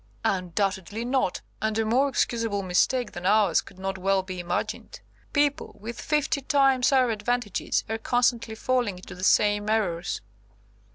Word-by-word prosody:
"Undoubtedly 195 +3 -1
not, 255 -7 0 0.2
and 220 0 0
a 225 - +1
more 260 +6 +3
excusable 230 -5 0
mistake 215 +7 +1
than 175 - -8
ours 205 -3 +4
could - - -16
not 190 0 -4
well 195 0 +1
be 185 -1 -6
imagined. 175 - -4 0.3
People, 290 -1 0
with 230 +3 -7
fifty 300 -2 0
times 270 -2 +3
our 255 -3 +4
advantages, 220 -1 -1
are 225 +1 -3
constantly 240 -2 +1
falling 240 -5 0
into 180 - -10
the 180 - -9
same 205 +1 +3
errors." 190 -6 -1
220 Hz, 150 wpm, -26 LUFS, 190-250 Hz, 0.3 s, ours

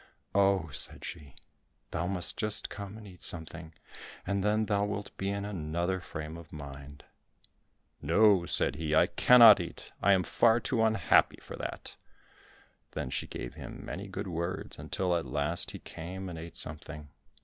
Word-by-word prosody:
"Oh," 95 -4 +3
said 70 - -5
she, 70 -3 -9 0.6
"thou 85 +1 -1
must 90 -3 +2
just 110 0 +2
come 100 +1 -7
and 110 - -11
eat 90 -3 -13
something, 80 0 -3 0.5
and 100 +1 -1
then 105 +1 +2
thou 100 -1 +1
wilt 105 -1 -4
be 95 - -2
in 100 0 -2
another 85 -1 -2
frame 80 -2 -7
of 85 -2 -13
mind." 70 -1 -10 1.0
"No," 95 +2 +4
said 70 - +2
he, 80 -1 -1
"I - - +6
cannot 115 -5 +8
eat, 85 - -7
I 100 - +5
am 95 -1 +3
far 115 +5 +3
too 120 0 0
unhappy 110 0 +3
for - - -9
that!" - - -5 1.0
Then 65 - -4
she - - -2
gave - - -6
him - - -9
many 100 +3 -6
good 95 +1 -5
words 85 +2 -4
until 90 -2 -1
at 85 - 0
last 75 +4 -2
he - - -6
came 95 +3 -7
and 85 -2 -7
ate 85 0 -9
something. 75 -1 -5
90 Hz, 165 wpm, -30 LUFS, 80-100 Hz, 1.0 s, cannot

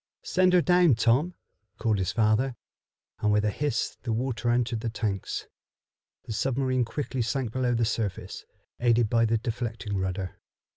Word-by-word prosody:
"Send 185 0 +3
her 180 -2 +5
down, 180 -6 +5
Tom," 125 +10 +2 0.4
called 110 -3 +1
his 95 +1 0
father, 115 +3 +2 0.6
and 105 - +2
with 105 0 +2
a 105 - +2
hiss 145 +5 -2
the 120 - -3
water 120 +1 -1
entered 120 -1 +1
the 115 - -2
tanks. 105 -4 -3 0.8
The 110 - -5
submarine 130 +1 0
quickly 130 +2 -3
sank 120 0 -1
below 125 0 0
the 115 0 +2
surface, 110 -3 -3 0.4
aided 120 -2 +3
by 115 -1 +4
the 115 +1 +2
deflecting 110 -3 -4
rudder. 95 -1 -3
115 Hz, 155 wpm, -27 LUFS, 110-130 Hz, 0.8 s, her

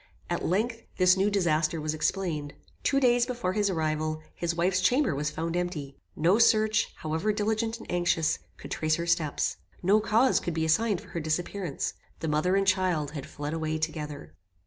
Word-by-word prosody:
At - - -1
length, 225 +6 0 0.2
this 185 0 +5
new 195 +2 +2
disaster 165 -5 +1
was 155 0 -2
explained. 155 -3 -2 0.3
Two 275 - +2
days 245 -2 +3
before 235 -8 -2
his 205 -1 +1
arrival, 155 -2 -1
his 170 -1 -2
wife's 185 +2 +1
chamber 250 - +3
was 150 +2 -1
found 165 +2 -3
empty. 165 -6 -3 0.2
No 175 +7 +3
search, 215 -1 +4
however 160 +7 -1
diligent 220 +2 -1
and 225 - -11
anxious, 175 -2 +1 0.2
could - - -10
trace 155 0 +1
her 170 - -3
steps. 165 -3 0 0.3
No 200 +4 +5
cause 225 +4 +3
could 170 - -4
be 160 -1 0
assigned 200 +5 +2
for 205 - -15
her 175 -1 -4
disappearance. 165 +1 -2 0.3
The 160 - -3
mother 155 +5 +2
and 195 0 +2
child 185 -6 +1
had 145 -3 -6
fled 145 +1 -5
away 160 -1 -1
together. 150 - -4
175 Hz, 180 wpm, -28 LUFS, 155-205 Hz, 0.3 s, this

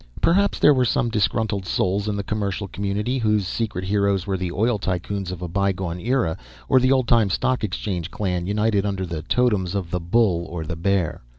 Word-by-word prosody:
_ - - -26 0.2
Perhaps 200 +4 +3
there 150 - +6
were 130 -2 +2
some 120 0 +1
disgruntled 105 -2 0
souls 100 +3 0
in 105 - -1
the 100 - -2
commercial 100 -1 -2
community, 100 +7 -2
whose 105 -3 +1
secret 95 -4 -3
heroes 100 -1 +1
were 95 - -1
the 90 -1 -3
oil 110 +4 +1
tycoons 95 +1 -3
of 90 -1 -6
a - - -3
bygone 95 -1 -1
era 115 -6 0 0.3
or 130 - +5
the 130 +1 +3
old 130 -3 +2
time 115 -4 +4
Stock 130 +5 0
Exchange 90 -4 -3
clan 90 -3 -2
united 105 0 +1
under 100 -2 -2
the 85 -3 -4
totems 100 -5 +1
of 90 -4 -3
the 90 - 0
bull 90 -1 +1
or 85 -2 -5
the 85 - -4
bear. 90 -1 0
100 Hz, 205 wpm, -23 LUFS, 90-110 Hz, 0.3 s, there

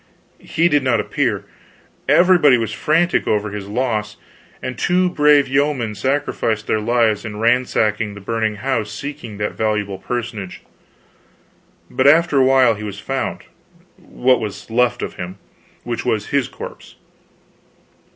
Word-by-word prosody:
He 165 +2 +1
did 145 -4 +2
not 130 -4 +1
appear. 105 - -1 0.6
Everybody 175 -7 +5
was 115 -2 -2
frantic 170 +4 +1
over 105 -1 0
this 100 -1 -6
loss, 105 -2 -2 0.4
and 130 - -5
two 180 +6 +1
brave 150 -3 +4
yeomen 135 -4 0
sacrificed 115 -2 -1
their 110 - 0
lives 115 -1 +1
in 110 -2 -6
ransacking 110 -2 +1
the - - -9
burning 110 +1 -2
house 110 -1 -2
seeking 130 -2 -7
that 105 0 -2
valuable 105 -3 -2
personage. 110 -5 -5 1.2
But 130 - +1
after 155 -1 +5
a - - +5
while 130 -3 +5
he 105 0 -8
was 100 -2 -6
found 135 +4 -3 0.5
what 125 0 +1
was 105 0 -7
left 125 0 +1
of - - -6
him 90 +2 -6 0.5
which - - -4
was - - -1
his - - +1
corpse. - - -10
120 Hz, 140 wpm, -19 LUFS, 105-135 Hz, 1.2 s, Everybody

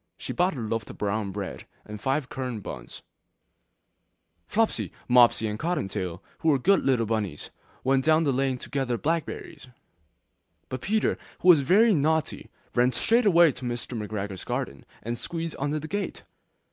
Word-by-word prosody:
She - - -5
bought 180 -1 +1
a - - -4
loaf 115 -1 -3
of - - -9
brown 105 0 -1
bread 100 -1 -6 0.2
and 105 -1 -8
five 135 +2 0
currant 125 -7 -5
buns. - - -8 1.4
Flopsy, 225 0 0 0.2
Mopsy, 120 -2 +5
and 105 0 -4
Cottontail, 95 - -2 0.2
who 160 - +2
were 145 - +5
good 195 +10 +3
little 125 -4 +2
bunnies, 105 -8 -3 0.3
went 135 0 +2
down 155 +2 +4
the 140 -3 +1
lane 135 0 0
to - - -10
gather 135 -4 0
blackberries: 160 -1 -3 1.0
But 130 -1 -4
Peter, 215 +1 +1 0.2
who 185 - +4
was 160 -5 +8
very 210 - +5
naughty, 160 0 0 0.2
ran 125 +1 +3
straight 230 - +3
away 170 -4 +6
to 130 - -11
Mr. 120 +1 -3
McGregor's 105 -3 -4
garden, 70 - -4 0.2
and 120 +1 -3
squeezed 165 -1 -4
under 145 +2 -1
the 155 +1 -5
gate! 205 +4 -4
130 Hz, 160 wpm, -26 LUFS, 110-160 Hz, 1.4 s, was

